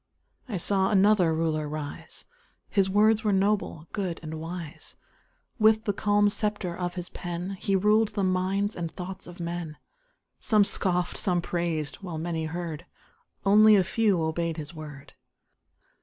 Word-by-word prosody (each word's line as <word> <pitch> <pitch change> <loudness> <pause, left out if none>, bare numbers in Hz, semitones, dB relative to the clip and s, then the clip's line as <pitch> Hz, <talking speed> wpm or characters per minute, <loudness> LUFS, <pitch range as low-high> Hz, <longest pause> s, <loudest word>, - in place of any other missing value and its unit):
I 210 - -2
saw 190 +2 +2
another 195 -3 +4
Ruler 160 -2 -1
rise 150 -1 -6 0.5
His 195 -2 +2
words 215 +3 +4
were 210 - +2
noble, 195 -5 0
good, 185 -5 -3
and 155 0 -6
wise; 165 -1 -7 0.6
With 220 0 +5
the 205 - 0
calm 205 +1 +2
sceptre 205 -5 -2
of 180 0 -3
his 180 -1 -5
pen 175 +2 -5
He 195 - 0
ruled 210 +3 +3
the 200 - 0
minds 190 +2 0
and 170 -2 -4
thoughts 185 +1 -7
of 175 0 -11
men; 170 -2 -5 0.6
Some 215 -3 +4
scoffed, 180 -3 0
some 180 -2 +1
praised 170 -4 -2
while 180 -5 -6
many 165 0 -2
heard, 170 0 -5 0.6
Only 215 +2 +7
a 195 - +4
few 205 -1 +1
obeyed 165 +1 -1
his 155 +1 -7
word. 150 -4 -10
180 Hz, 150 wpm, -27 LUFS, 165-205 Hz, 0.6 s, Only